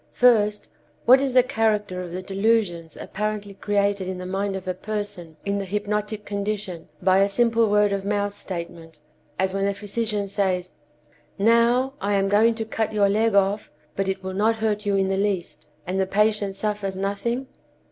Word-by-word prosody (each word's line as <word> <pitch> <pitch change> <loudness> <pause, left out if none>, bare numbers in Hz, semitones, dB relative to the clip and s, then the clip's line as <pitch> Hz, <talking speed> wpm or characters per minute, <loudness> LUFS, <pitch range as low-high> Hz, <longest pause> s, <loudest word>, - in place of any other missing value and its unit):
First, 210 -4 +3 0.4
what 260 +2 +7
is 270 -2 -1
the 255 -1 +6
character 215 -7 0
of 180 -1 -7
the 185 +2 -5
delusions 195 -5 0
apparently 210 0 -4
created 200 -1 0
in 185 0 -4
the 180 - -6
mind 195 +1 -2
of 190 -1 -6
a 185 - 0
person 185 -5 -6
in 200 0 0
the - - -2
hypnotic 210 +1 -2
condition 200 -4 -4
by 185 +1 +5
a 200 +1 +4
simple 230 +1 +2
word 210 0 +3
of 200 -1 -1
mouth 205 0 -1
statement, 170 -4 -7 0.4
as 190 0 0
when 195 0 0
a 200 - -1
physician 210 0 -2
says, 185 -2 -1 0.7
"Now, 235 +5 +3
I 200 0 +1
am 195 0 +2
going 220 +3 +4
to 225 -1 -3
cut 220 0 -2
your 205 -2 +3
leg 215 +1 +2
off, 200 +1 +2 0.3
but 195 0 -1
it 190 0 -2
will 190 0 -4
not 215 +4 +2
hurt 215 -1 -1
you 200 - +2
in 195 -1 +2
the 190 0 0
least," 195 -3 -2 0.2
and 185 +2 -2
the 190 - +1
patient 210 0 +1
suffers 205 -2 -2
nothing? 205 +6 -2
200 Hz, 185 wpm, -24 LUFS, 190-215 Hz, 0.7 s, what